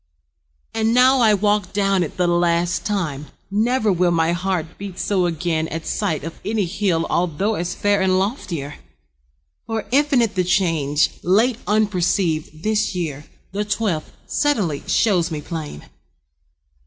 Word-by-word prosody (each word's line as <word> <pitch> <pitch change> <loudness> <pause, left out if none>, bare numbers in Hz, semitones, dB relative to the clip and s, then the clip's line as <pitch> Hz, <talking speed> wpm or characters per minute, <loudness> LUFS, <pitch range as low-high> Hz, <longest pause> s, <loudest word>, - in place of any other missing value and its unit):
And 225 +1 +1
now 255 +1 +5
I 220 -3 +5
walk 205 -1 0
Down 195 -2 +2
it 165 - -3
the 180 - +2
last 175 0 +1
time. 155 -9 -2 0.2
Never 220 0 +2
will 180 0 +2
My 165 -1 +2
heart 175 -2 -2
beat 195 -2 -7
so 185 -3 +1
again 160 -1 -1
at 165 0 -5
sight 155 -3 -1
Of 165 +1 -7
any 215 -2 0
hill 175 -2 0
although 180 +5 0
as 175 -3 -3
fair 205 -1 +1
And 185 -1 +3
loftier. 180 - -3 0.9
For 225 -2 -3
infinite 270 -5 +3
The 185 - +1
change, 165 -6 +1
late 220 +6 +2
unperceived, 180 -6 0
this 215 -2 0
year, 150 -5 -4 0.3
The 205 +2 -1
twelfth, 205 -6 -2
suddenly, 205 - 0
shows 185 -6 +2
me 155 -3 -4
plain. 150 - -6
185 Hz, 140 wpm, -21 LUFS, 165-210 Hz, 0.9 s, now